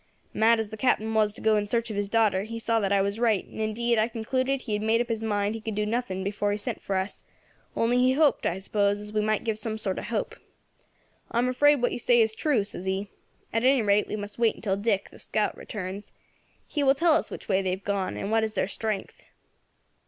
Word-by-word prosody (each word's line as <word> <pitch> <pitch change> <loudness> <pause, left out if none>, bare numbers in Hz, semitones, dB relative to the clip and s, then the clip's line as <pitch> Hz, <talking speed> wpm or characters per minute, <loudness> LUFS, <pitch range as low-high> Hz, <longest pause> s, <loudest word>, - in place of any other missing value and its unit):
"Mad 225 +1 +4
as 220 -2 -2
the 220 - -7
Captain 220 -2 +1
was 215 -1 +3
to - - -9
go 220 -1 +3
in 205 0 -1
search 230 +1 -1
of - - -4
his 200 0 -2
daughter, 215 -4 +3
he 225 +3 -6
saw 230 0 +1
that 200 -2 -1
I 200 -1 +3
was 200 +2 -2
right, 225 -5 +2
and - - -8
indeed 230 +2 +1
I 215 - +3
concluded 255 +4 -1
he 220 - -4
had 210 - 0
made 220 +1 +2
up 240 - -1
his 225 -1 -2
mind 205 -1 0
he 225 - -6
could 220 -1 -4
do 210 0 0
nothing 210 -4 -2
before 205 +1 -1
he 205 - 0
sent 205 - -5
for 195 - -3
us, 190 +1 -3 0.5
only 240 +2 +2
he 255 +1 +4
hoped, 300 +1 +3
I 175 - -1
suppose, 200 +1 0
as 210 0 -8
we 215 - +2
might 215 0 0
give 220 -2 -1
some 220 0 -3
sort 195 -4 -1
of - - -6
hope. - - -2 1.0
'I - - -3
am 245 +1 +2
afraid 290 +1 +4
what 245 - +3
you - - -3
say 240 0 +4
is 220 -1 +3
true,' 255 -3 +1
says 195 -2 -7
he. 195 +1 -2 0.4
'At 225 +1 +1
any 260 -2 +4
rate 205 0 +3
we - - -3
must 205 +1 -7
wait 230 -2 +1
till 195 -3 +1
Dick, 200 -1 -1
the - - -15
scout, 215 - -1
returns; 195 0 -7 0.5
he 295 - -3
will 270 -1 +4
tell 330 +2 +4
us 315 - +1
which - - -8
way 195 -1 +2
they 190 - -1
have 190 +2 -3
gone, 200 -2 -2
and 200 - -3
what 225 0 +3
is 220 -1 -3
their - - +1
strength.' 210 -1 -4
215 Hz, 255 wpm, -27 LUFS, 205-235 Hz, 1.0 s, Mad